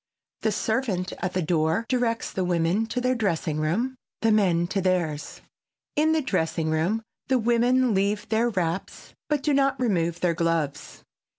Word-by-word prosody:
The 220 - +1
servant 215 -4 -1
at 180 - -2
the 185 - 0
door 160 +5 +1
directs 240 -3 0
the 190 - -1
women 175 +5 +1
to 250 - -2
their 250 +1 +1
dressing 175 -9 -1
room, 200 +13 0 0.3
the 225 - +4
men 180 -5 +3
to 195 0 0
theirs. 170 -5 -1 0.5
In 310 +2 +3
the 315 -1 +2
dressing 165 -7 0
room 180 +9 0 0.2
the 260 - +3
women 240 +1 +3
leave 200 +2 0
their 225 +2 +2
wraps, 180 -4 -3 0.2
but 295 -2 0
do 295 - +2
not 275 -1 +2
remove 175 -8 0
their 175 -2 +2
gloves. 165 -4 -2
195 Hz, 165 wpm, -25 LUFS, 170-240 Hz, 0.5 s, the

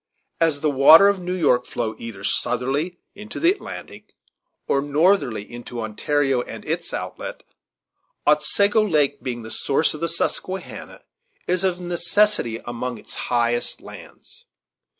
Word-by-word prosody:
As 160 -4 +1
the 150 - +2
waters 160 +9 +7
of - - -10
New 180 +1 -3
York 130 -8 +2
flow 110 -2 -3
either 110 -4 -8
southerly 135 - 0 0.2
into 210 +3 -8
the 335 +2 +4
Atlantic 400 - -9 0.5
or 140 - +2
northerly 145 - +2
into 120 +2 -9
Ontario 135 +4 0
and - - -9
its - - -3
outlet, - - -6 0.8
Otsego 200 +9 +4
Lake, 155 -8 +1
being 120 -3 -4
the 110 - -8
source 140 +3 +1
of 155 - -9
the 170 - 0
Susquehanna, 185 +3 -3 0.4
is 180 +1 0
of 185 -2 0
necessity 175 - +1
among 120 0 -4
its - - -10 0.2
highest 120 0 0
lands. - - -13
145 Hz, 135 wpm, -22 LUFS, 120-180 Hz, 0.8 s, waters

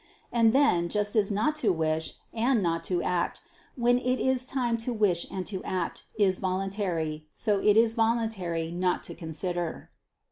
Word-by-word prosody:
And 230 -2 +4
then, 220 -11 +3
just 210 +2 0
as 210 -2 +3
not 220 +10 +1
to 225 -9 +2
wish, 160 -1 -1 0.2
and 235 -1 +2
not 165 -1 0
to 180 -2 0
act, 175 -1 -1 0.4
when 245 0 +3
it 255 0 0
is 260 -1 +1
time 245 -4 0
to 230 +2 -2
wish 205 -7 +1
and 185 -1 -4
to 190 -3 -5
act, 180 -2 -3
is 190 -3 +2
voluntary, 185 -5 -2
so 210 -3 +1
is 220 +3 +4
it - - -15
voluntary 220 -8 0
not 180 +1 0
to - - -7
consider. 175 +1 -4
200 Hz, 170 wpm, -28 LUFS, 175-230 Hz, 0.4 s, And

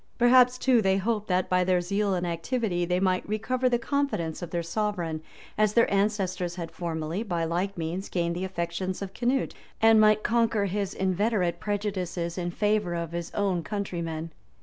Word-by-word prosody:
Perhaps, 250 +1 +6
too, 250 -3 +3
they 190 -1 +2
hoped 210 +1 -1
that, 185 0 +1
by 180 0 +2
their 180 0 +2
zeal 200 +2 0
and 180 0 -1
activity, 175 +2 -1
they 180 +1 +1
might 185 -1 +1
recover 250 +4 0
the 240 - +2
confidence 235 - -1
of 175 - -5
their 170 0 -2
sovereign, 170 -4 -2 0.4
as 215 -1 +3
their 230 -2 +3
ancestors 190 -4 0
had 170 -3 -6
formerly, 165 +1 -3
by 175 -7 -2
like 180 +4 -1
means, 170 +4 -3
gained 170 -1 -1
the 180 - -3
affections 185 +1 -3
of 195 -1 -7
Canute; 250 +4 0 0.3
and 225 0 +6
might 215 0 +4
conquer 230 -3 +2
his 200 0 -2
inveterate 190 -2 0
prejudices 190 -5 -2
in 175 -1 -2
favor 205 -1 0
of 170 -1 -3
his 170 0 -4
own 195 -4 +1
countrymen. 165 -4 -4
190 Hz, 175 wpm, -27 LUFS, 175-215 Hz, 0.4 s, Perhaps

